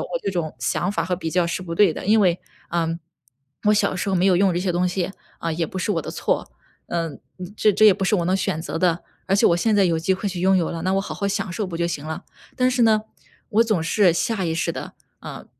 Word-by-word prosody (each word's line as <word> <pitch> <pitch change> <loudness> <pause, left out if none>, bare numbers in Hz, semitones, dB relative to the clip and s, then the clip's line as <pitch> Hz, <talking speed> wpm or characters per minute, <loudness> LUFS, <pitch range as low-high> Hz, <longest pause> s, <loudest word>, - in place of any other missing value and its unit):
我 - - -5
这 195 - -3
种 165 -4 -2
想 180 - -1
法 165 -5 -1
和 180 +1 -1
比 165 -3 -4
较 175 0 +2
是 180 +2 -3
不 165 -2 -6
对 200 -6 +5
的， - - -7
因 220 +1 +5
为， 180 -3 +3 0.3
嗯， 165 -1 -1 0.7
我 - - +6
小 200 -2 +2
时 185 +2 -2
候 190 - +1
没 180 +2 +2
有 185 - +4
用 190 0 +3
这 175 - -1
些 180 0 -1
东 180 +1 +1
西， 185 +1 -2 0.3
啊， 165 -1 -2
也 165 +1 -1
不 185 - -6
是 205 - 0
我 - - -1
的 - - -6
错。 - - -2 0.4
呃， 165 -2 -2 0.5
这 210 - +3
这 215 - +3
也 210 - +9
不 195 - -2
是 190 - +2
我 170 - 0
能 185 +2 +2
选 175 -4 -2
择 165 - -4
的， 175 -1 +1 0.2
而 195 - +2
且 200 - +3
我 170 - +5
现 215 +4 +1
在 200 -2 +4
有 165 -2 +1
机 175 +4 +1
会 200 +2 -3
去 180 -2 -5
拥 190 +1 +4
有 170 - 0
了， 165 -1 -5
那 185 +1 0
我 195 - +2
好 195 - -6
好 200 - -2
享 195 -2 -2
受 210 0 -2
不 170 -2 -5
就 170 - 0
行 155 -3 -3
了。 160 - -5 0.3
但 255 -1 +2
是 250 -1 +1
呢， 215 -1 +4 0.5
我 230 0 +3
总 215 -8 0
是 180 +1 +3
下 195 +2 -1
意 160 -1 -1
识 165 - -1
地， - - -6 0.3
啊， - - -9
185 Hz, 295 characters per minute, -22 LUFS, 170-200 Hz, 0.7 s, 也